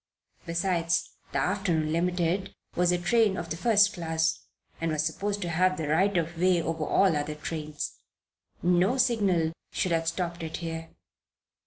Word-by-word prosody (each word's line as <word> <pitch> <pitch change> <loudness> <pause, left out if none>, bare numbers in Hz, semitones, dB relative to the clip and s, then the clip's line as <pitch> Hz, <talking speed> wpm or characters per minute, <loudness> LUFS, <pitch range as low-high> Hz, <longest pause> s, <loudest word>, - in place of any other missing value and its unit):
Besides, 170 0 0 0.2
the - - -1
afternoon 180 -5 0
Limited 180 +2 0 0.2
was 180 0 +3
a 180 - +2
train 205 +3 +2
of 170 -1 -5
the - - 0
first 205 +2 +4
class 160 -3 -1 0.4
and 165 -1 0
was 155 0 0
supposed 200 +5 -2
to 175 - -3
have 185 +2 +2
the 155 -3 -3
right 185 +5 +3
of 165 0 -2
way 180 0 +4
over 160 -1 -2
all 190 +1 +3
other 150 +1 -2
trains. 150 -1 -5 0.6
No 180 +8 +3
signal 200 -10 +2 0.2
should 185 - -1
have 165 -1 +1
stopped 170 0 -2
it 160 -1 -4
here. 165 -1 -5
170 Hz, 160 wpm, -28 LUFS, 160-185 Hz, 0.6 s, first